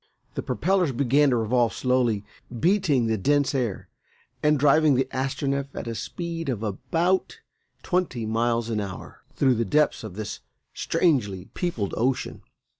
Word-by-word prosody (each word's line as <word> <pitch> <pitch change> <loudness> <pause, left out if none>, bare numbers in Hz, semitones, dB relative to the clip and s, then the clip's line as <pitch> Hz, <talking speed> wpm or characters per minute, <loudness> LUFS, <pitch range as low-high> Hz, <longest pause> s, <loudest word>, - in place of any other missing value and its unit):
The - - -3
propellers 180 -2 +1
began 140 +3 +3
to 125 - +2
revolve 115 +1 +1
slowly, 120 -5 +1 0.3
beating 165 - +2
the 110 -2 0
dense 145 +6 +2
air 120 -7 -2 0.5
and 150 0 +3
driving 150 +1 +4
the 130 - +1
Astronef 135 +1 -1
at - - -5
a 115 - -3
speed 165 +5 -5
of 115 -4 -2
about 165 - -1 0.4
twenty 175 - -1
miles 115 +1 0
an 110 - 0
hour 95 -2 -8
through 130 -2 +3
the 115 -1 0
depths 150 +7 +1
of 105 -5 -7
this 110 0 -5 0.3
strangely 105 - 0
peopled 125 - -2
ocean. 125 +3 -1
130 Hz, 145 wpm, -25 LUFS, 115-150 Hz, 0.5 s, driving